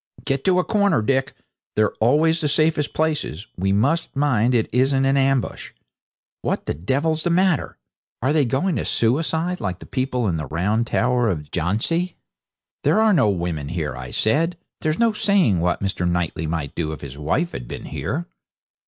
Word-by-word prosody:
'Get 135 Hz, 0 st, -1 dB
to 185 Hz, -1 st, +4 dB
a 180 Hz, -, +3 dB
corner, 200 Hz, -, +2 dB
Dick; 135 Hz, +3 st, 0 dB, 0.4 s
they're 110 Hz, -1 st, +2 dB
always 155 Hz, +8 st, +3 dB
the 150 Hz, -, +1 dB
safest 155 Hz, 0 st, +1 dB
places. 150 Hz, -, -1 dB
We 95 Hz, +2 st, 0 dB
must 135 Hz, +12 st, +1 dB
mind 130 Hz, -4 st, +2 dB
it 115 Hz, -, +2 dB
isn't 135 Hz, +2 st, +3 dB
an 135 Hz, +1 st, +3 dB
ambush. 135 Hz, -2 st, 0 dB, 0.7 s
What -, -, -2 dB
the -, -, -1 dB
devil's 140 Hz, -, 0 dB
the 175 Hz, -, 0 dB
matter? 180 Hz, -2 st, +1 dB, 0.4 s
Are 130 Hz, +5 st, +1 dB
they 155 Hz, -2 st, +4 dB
going 140 Hz, +8 st, 0 dB
to -, -, -2 dB
suicide, 160 Hz, +8 st, 0 dB
like 95 Hz, -4 st, -2 dB
the -, -, -12 dB
people 130 Hz, -3 st, -1 dB
in 85 Hz, -4 st, 0 dB
the 75 Hz, -3 st, -4 dB
round 105 Hz, -, 0 dB
tower 125 Hz, 0 st, +2 dB
of 75 Hz, -6 st, -4 dB
Jhansi?' 110 Hz, -, -1 dB, 0.7 s
'There -, -, +3 dB
are 220 Hz, -1 st, +4 dB
no 135 Hz, -, +4 dB
women 85 Hz, -6 st, -2 dB
here,' 80 Hz, -6 st, -3 dB
I -, -, -7 dB
said. 165 Hz, +10 st, +1 dB, 0.2 s
'There's 155 Hz, +1 st, -1 dB
no 230 Hz, -1 st, +3 dB
saying 195 Hz, -, +2 dB
what 90 Hz, +3 st, 0 dB
Mr. 90 Hz, -2 st, -1 dB
Knightley 85 Hz, -2 st, -1 dB
might 80 Hz, -3 st, -3 dB
do 80 Hz, -2 st, -2 dB
if -, -, -9 dB
his 70 Hz, 0 st, -8 dB
wife 130 Hz, -, 0 dB
had -, -, -7 dB
been -, -, -7 dB
here.' 165 Hz, +4 st, -3 dB
130 Hz, 180 wpm, -22 LUFS, -, 0.7 s, to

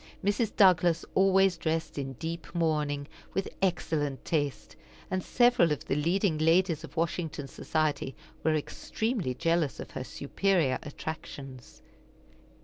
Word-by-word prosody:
Mrs. 210 Hz, +2 st, +1 dB
Douglas 175 Hz, -4 st, +5 dB
always 190 Hz, -1 st, +4 dB
dressed 160 Hz, -2 st, -2 dB
in 135 Hz, -1 st, -4 dB
deep 165 Hz, +5 st, -6 dB
mourning, 150 Hz, -4 st, 0 dB, 0.3 s
with 195 Hz, +1 st, 0 dB
excellent 155 Hz, -7 st, 0 dB
taste, 145 Hz, -4 st, -2 dB, 0.4 s
and 185 Hz, 0 st, 0 dB
several 240 Hz, -9 st, +4 dB
of 150 Hz, -, -2 dB
the -, -, -1 dB
leading 170 Hz, +2 st, +1 dB
ladies 165 Hz, 0 st, +3 dB
of 160 Hz, +1 st, -11 dB
Washington 160 Hz, -3 st, -2 dB
society 150 Hz, -3 st, -1 dB, 0.3 s
were 160 Hz, -1 st, +3 dB
extremely 190 Hz, -, -2 dB
jealous 165 Hz, 0 st, +1 dB
of -, -, -7 dB
her -, -, -4 dB
superior 145 Hz, 0 st, 0 dB
attractions. 140 Hz, -4 st, -8 dB
160 Hz, 125 wpm, -29 LUFS, 145-185 Hz, 0.4 s, Douglas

